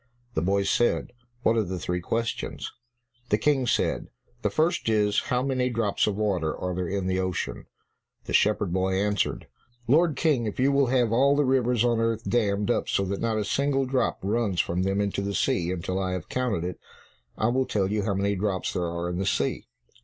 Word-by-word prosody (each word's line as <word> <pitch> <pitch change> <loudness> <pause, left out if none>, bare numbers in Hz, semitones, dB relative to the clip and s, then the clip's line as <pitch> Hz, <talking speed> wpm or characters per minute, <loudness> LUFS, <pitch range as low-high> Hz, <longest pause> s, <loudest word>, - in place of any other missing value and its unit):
The - - 0
boy 100 +3 +1
said, 120 +5 +1 0.3
"What 115 - +3
are 110 - +3
the 95 -1 -4
three 90 0 -2
questions?" 115 +6 -3 0.6
The 105 - +3
King 135 -1 +1
said, - - 0 0.3
"The - - +1
first 165 -5 +1
is, 105 -2 +3
how 125 0 +1
many 130 -2 0
drops 115 -4 0
of 105 - 0
water 95 -7 -1
are 90 0 -3
there 90 0 -2
in 95 +1 -2
the 95 0 0
ocean?" 95 -2 -3 0.6
The - - -5
shepherd 105 -4 +2
boy 95 0 +1
answered, 105 0 0 0.4
"Lord 155 +4 +4
King, 135 -7 +1
if 105 - -5
you 135 +2 +4
will 140 -1 +3
have 120 -3 +2
all 135 +4 +4
the 145 0 +2
rivers 125 -3 +2
on 120 -1 +2
earth 115 0 -1
dammed 105 -2 +1
up - - -1
so 100 - +1
that 100 +1 -3
not 115 -1 0
a 105 - -1
single 135 +4 +1
drop 130 -2 0
runs 100 -2 0
from 90 +2 0
them 95 +2 +1
into 100 -1 -1
the 100 0 -3
sea 120 -11 +1
until 95 +1 -2
I 95 -1 -1
have 90 -4 -5
counted 125 -9 -1
it, 90 0 -4 0.6
I 110 - +2
will 130 +2 +1
tell 100 -3 +1
you 105 0 +1
how 100 -1 0
many 100 +1 0
drops 95 -1 -1
there 90 -2 -1
are 85 +1 -3
in 90 0 -3
the 95 - -1
sea." 70 -8 -1
105 Hz, 210 wpm, -26 LUFS, 95-125 Hz, 0.6 s, Lord